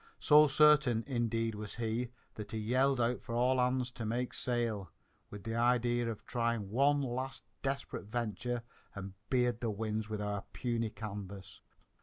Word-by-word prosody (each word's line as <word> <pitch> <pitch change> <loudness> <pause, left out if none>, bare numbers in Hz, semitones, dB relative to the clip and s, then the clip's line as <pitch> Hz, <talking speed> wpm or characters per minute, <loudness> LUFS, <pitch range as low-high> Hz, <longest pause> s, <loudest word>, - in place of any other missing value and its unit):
So 150 0 +7
certain, 145 -5 +5
indeed, 115 -3 0
was 105 -1 -6
he, 120 +1 -1 0.2
that 105 0 -7
he - - -1
yelled 130 +5 +2
out 120 +1 +1
for 115 -1 -5
all 125 +2 +3
hands 125 0 +1
to 120 - -6
make 120 +3 -1
sail, 115 -6 -1 0.4
with 105 -2 -9
the 115 +1 -3
idea 120 0 +2
of 110 - -6
trying 115 -4 -1
one 140 +4 +4
last 130 +1 -3 0.2
desperate 135 -5 -3
venture 120 +2 -2 0.3
and 100 -1 -6 0.2
beard 125 -3 +2
the 115 - 0
winds 110 0 -2
with 105 -1 -3
our 105 -1 -2
puny 115 -3 -1
canvas. 100 -3 -7
120 Hz, 160 wpm, -33 LUFS, 110-125 Hz, 0.4 s, So